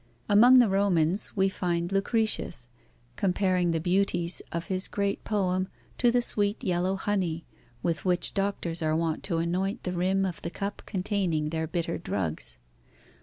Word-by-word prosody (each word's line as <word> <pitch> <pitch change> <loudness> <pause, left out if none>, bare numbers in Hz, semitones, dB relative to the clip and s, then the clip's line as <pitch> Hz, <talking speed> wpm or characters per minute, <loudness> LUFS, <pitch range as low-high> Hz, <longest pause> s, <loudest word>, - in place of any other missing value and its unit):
Among 240 +5 +7
the 245 -2 +6
Romans, 190 -2 +1
we 190 -1 +3
find 175 -2 -2
Lucretius 195 - 0 0.5
comparing 185 -2 +1
the 165 -1 +1
beauties 175 0 +1
of 170 +1 -3
his 190 -1 0
great 200 -1 -2
poem 185 -3 0 0.3
to 240 - +4
the 245 0 +2
sweet 205 -2 0
yellow 185 0 0
honey, 185 -5 -1 0.4
with 165 -4 -1
which 180 -1 +2
doctors 195 -4 0
are 155 0 +1
wont 165 -1 -1
to 175 -4 -1
anoint 185 +6 -1
the 180 - -3
rim 190 +2 +1
of 180 -3 -4
the 170 - -4
cup 200 +3 -5
containing 185 -6 -1
their 160 0 -2
bitter 170 0 -2
drugs. 80 - -3
185 Hz, 155 wpm, -28 LUFS, 170-200 Hz, 0.5 s, Among